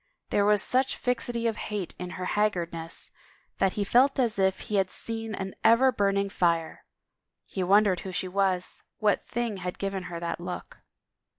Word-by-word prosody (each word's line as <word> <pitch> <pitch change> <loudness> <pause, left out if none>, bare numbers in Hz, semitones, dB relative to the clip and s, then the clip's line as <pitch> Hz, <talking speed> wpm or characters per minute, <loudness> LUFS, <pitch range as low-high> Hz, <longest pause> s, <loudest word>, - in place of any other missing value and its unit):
There 205 - +3
was 210 -1 +4
such 260 +1 +2
fixity 245 -1 -1
of 225 -2 0
hate 205 -5 -3
in 180 0 -4
her 180 - -3
haggardness 170 -6 -1 0.5
that 195 - +2
he 205 - -1
felt 255 +7 +4
as 235 -6 +1
if 190 0 +2
he 210 - -2
had 190 -1 +2
seen 225 -1 -4
an 190 0 -5
ever 255 +3 +6
burn 200 -3 +1
ing 200 0 0
fire. 170 -4 0 0.6
He 190 - -4
wondered 195 0 +4
who 190 - -6
she 185 - -2
was, 185 -1 0 0.2
what 210 -2 +2
thing 235 -3 -3
had 180 -1 -5
given 195 -2 -3
her 170 -1 -5
that 170 0 -3
look. 180 +1 -7
195 Hz, 180 wpm, -28 LUFS, 180-220 Hz, 0.6 s, ever